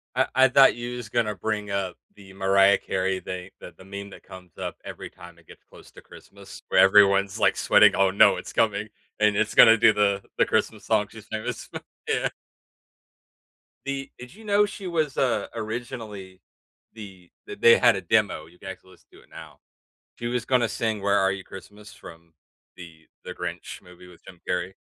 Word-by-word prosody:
I - - +2
I 130 0 +6
thought 135 -1 +5
you 120 +1 -6
was 115 -4 -8
gonna 110 -3 -1
bring 105 +1 -4
up 95 -2 -3 0.2
the 95 -2 -15
Mariah 95 +1 +3
Carey 95 0 -2
thing, 90 0 -7
the 90 - -12
the 95 - -15
meme 100 +1 -8
that - - -14
comes 90 -2 -14
up - - -5
every - - -9
time 85 -2 -15
it 85 - -25
gets - - -17
close - - -18
to - - -15
Christmas - - -15
where - - +3
everyone's, 100 0 +4
like, - - +2
sweating, 105 -1 +5
"Oh, 95 -1 +2
no, 100 - +5
it's - - -9
coming." 105 -1 0 0.3
And 105 -1 +2
it's 110 0 -1
gonna 115 -1 +8
do 110 -1 +5
the 100 -1 0
the - - +3
Christmas - - -2
song 105 -2 +1
she's 110 -1 -13
famous 110 0 -6 0.4
Yeah. - - 0 1.6
The 135 0 -4
did 125 +5 -12
you 220 +2 -16
know 205 0 +3
she 200 -2 -8
was, 155 -5 -2
uh, 130 -3 0
originally 110 -5 -7 0.5
the 95 -5 -12 0.2
that 415 0 -10
they 470 0 +7
had - - +4
a - - -4
demo. 105 -8 0
You 90 +2 -21
can 95 - -9
actually 95 0 -11
listen - - -22
to - - -17
it - - -25
now. - - -13 0.6
She 120 - -6
was 120 -1 -2
gonna 125 -3 +1
sing 110 -2 -3
Where 100 0 +2
Are 95 0 +2
You 95 -1 -7
Christmas 105 +2 -13
from 85 0 -15 0.4
The 80 -3 -14 0.2
The 90 - -7
Grinch 90 +1 -7
movie 90 0 -16
with 90 -2 -18
Jim 90 -3 -15
Carrey, 90 +1 -2
100 Hz, 195 wpm, -24 LUFS, 95-115 Hz, 1.6 s, gonna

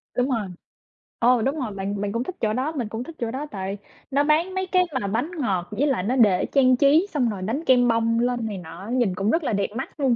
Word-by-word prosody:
Đúng 250 +2 +1
rồi. 225 -6 -1 0.7
Ô, 245 0 +4
đúng 270 +6 0
rồi. 235 -5 -3
Bạn 200 +1 -3
bạn 205 - -2
cũng 230 +3 -1
thích 370 - -6
chỗ 215 -1 +1
đó, 265 +6 -1
mình 245 -6 -2
cũng 225 +3 -4
thích 325 +4 -10
chỗ 230 -1 -2
đó 275 +4 -4
tại 195 0 -4 0.3
nó 280 +2 +3
bán 320 +5 +2
mấy 375 0 -1
cái 365 -1 +4 0.2
mà 200 - -2
bánh 240 - -1
ngọt 190 -9 -1
với 290 +3 +1
lại 245 -10 0
nó 245 +6 0
để 205 -7 +4
trang 255 -2 +4
trí 300 +8 +4
xong 255 -6 +1
rồi 200 -3 -5
đánh 230 - -2
kem 245 -1 +5
bông 230 0 +2
lên 245 -1 0
này 205 -3 -4
nọ 170 0 -10
á, 200 - -8
nhìn 240 -7 +1
cũng 195 +3 0
rất 330 -1 +1
là 230 - -1
đẹp 200 0 +1
mắt 265 +4 -6
luôn. 265 -4 +3
240 Hz, 270 wpm, -24 LUFS, 205-275 Hz, 0.7 s, kem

